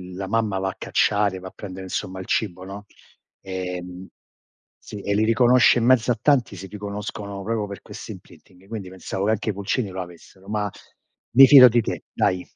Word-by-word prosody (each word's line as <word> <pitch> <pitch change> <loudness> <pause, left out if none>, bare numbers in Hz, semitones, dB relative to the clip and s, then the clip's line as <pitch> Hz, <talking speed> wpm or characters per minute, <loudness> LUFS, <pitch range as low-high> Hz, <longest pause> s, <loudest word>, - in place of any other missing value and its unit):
la 95 +1 -5
mamma 110 -1 0
va 95 0 -1
a - - -8
cacciare, 100 -2 +1
va 95 - -9
a - - -23
prendere 95 -2 -9
insomma 95 0 -4
il 95 - -7
cibo, 95 -4 -1
no, 100 +2 -9 0.6
ehm 90 -1 -6 0.7
sì 105 - -9
e 100 +1 -1
li 110 +1 +2
riconosce 120 +2 +5
in 115 - 0
mezzo 125 -1 +4
a 120 - 0
tanti, 135 -8 +2
si 95 +1 -8
riconoscono 100 0 -6
proprio 110 0 -2
per 100 -1 -9
questo - - -9
imprinting. 95 +1 -16
Quindi 105 -3 -6
pensavo 95 +1 -5
che 110 - +2
anche 110 0 -1
i - - 0
pulcini 100 +3 -2
lo 95 0 -5
avessero, 90 +2 -13
ma 105 -1 -1 0.7
mi 135 +2 +10
fido 130 -2 +10
di 120 +1 +2
te, - - -5
dai. 90 -2 0
100 Hz, 195 wpm, -23 LUFS, 95-110 Hz, 0.7 s, mi